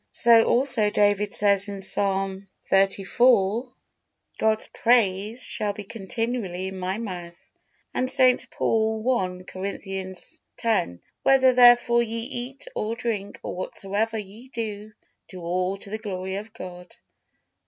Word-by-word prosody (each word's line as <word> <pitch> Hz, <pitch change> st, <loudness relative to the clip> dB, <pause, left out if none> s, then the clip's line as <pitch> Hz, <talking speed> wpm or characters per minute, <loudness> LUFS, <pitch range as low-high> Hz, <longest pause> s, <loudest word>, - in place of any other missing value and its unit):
So 230 Hz, -1 st, +6 dB
also 240 Hz, -4 st, +2 dB
David 205 Hz, 0 st, +2 dB
says 200 Hz, -1 st, +2 dB
in 200 Hz, -1 st, -6 dB
Psalm 195 Hz, 0 st, -1 dB, 0.2 s
xxxiv: 200 Hz, +4 st, +3 dB, 0.7 s
"God's 220 Hz, 0 st, +1 dB
praise 225 Hz, -1 st, +2 dB
shall 210 Hz, -1 st, -2 dB
be 210 Hz, 0 st, -7 dB
continually 205 Hz, -3 st, -3 dB
in 190 Hz, 0 st, -8 dB
my 185 Hz, +2 st, -2 dB
mouth." 175 Hz, -6 st, -6 dB, 0.6 s
And 255 Hz, -, 0 dB
St. 255 Hz, -1 st, +3 dB
Paul, 220 Hz, 0 st, 0 dB
I. 180 Hz, -1 st, -4 dB
Corinthians 190 Hz, 0 st, -6 dB, 0.2 s
x: 220 Hz, -, +1 dB, 0.3 s
"Whether 265 Hz, -1 st, +5 dB
therefore 240 Hz, -1 st, +6 dB
ye 230 Hz, 0 st, -2 dB
eat 250 Hz, -, -6 dB
or 225 Hz, -, -2 dB
drink, 225 Hz, -4 st, -3 dB
or -, -, -4 dB
whatsoever 205 Hz, +4 st, -2 dB
ye 215 Hz, +4 st, -9 dB
do, 215 Hz, -4 st, -5 dB, 0.4 s
do 185 Hz, -2 st, -9 dB
all 180 Hz, +3 st, -1 dB
to 200 Hz, 0 st, -9 dB
the 215 Hz, -, -3 dB
glory 190 Hz, -2 st, -4 dB
of 215 Hz, +2 st, -7 dB
God." 180 Hz, -3 st, -10 dB
210 Hz, 130 wpm, -25 LUFS, 190-230 Hz, 0.7 s, So